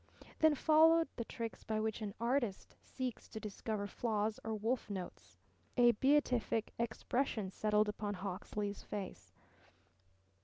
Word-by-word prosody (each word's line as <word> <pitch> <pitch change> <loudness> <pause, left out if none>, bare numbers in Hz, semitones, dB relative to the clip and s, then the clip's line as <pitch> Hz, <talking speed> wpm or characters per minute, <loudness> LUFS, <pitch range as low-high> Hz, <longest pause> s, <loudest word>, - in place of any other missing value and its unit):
Then 315 -1 +6
followed 320 +2 +5
the 235 - -3
tricks 230 -1 -5
by 220 -1 -1
which 220 0 -1
an 205 -2 -4
artist 235 -4 -1
seeks 255 -3 -5
to 220 - -6
discover 210 0 -3
flaws 215 0 -1
or 220 0 -2
wolf 225 +3 -1
notes. 190 -3 -7 0.4
A 240 -1 +7
beatific 250 -3 +2
expression 230 -2 -1
settled 210 +1 +2
upon 210 -1 -3
Hawksley 200 +2 -3
face. 200 -1 -7
220 Hz, 125 wpm, -36 LUFS, 210-245 Hz, 0.4 s, A